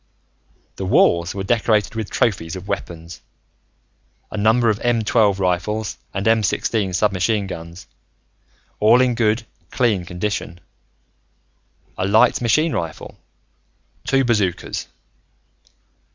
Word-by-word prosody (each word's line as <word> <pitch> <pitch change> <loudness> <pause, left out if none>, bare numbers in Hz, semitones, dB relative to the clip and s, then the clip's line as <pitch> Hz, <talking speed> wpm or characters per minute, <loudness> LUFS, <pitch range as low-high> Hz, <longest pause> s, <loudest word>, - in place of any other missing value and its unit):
The - - -4
walls 85 +2 +3
were 95 - -3
decorated 110 -1 +1
with 110 -2 -4
trophies 95 -7 -1
of 95 +1 -8
weapons 85 -4 -6 1.1
a - - -6
number 110 +3 +3
of 105 - -3
M 120 -2 +1
12 105 -3 +2
rifles 95 +3 -1 0.2
and 100 +3 -3
M 115 0 +4
16 100 0 -1
submachine 100 +2 +1
guns, 85 -2 -8 0.9
all 110 +4 +5
in 130 -1 +3
good, 115 0 +1 0.2
clean 110 -7 +1
condition; 90 0 -4 1.4
a 95 - 0
light 110 +4 +4
machine 155 +7 +2
rifle; 80 -2 -5 0.8
two 135 -1 +1
bazookas. 105 -7 -1
105 Hz, 110 wpm, -20 LUFS, 90-115 Hz, 1.4 s, all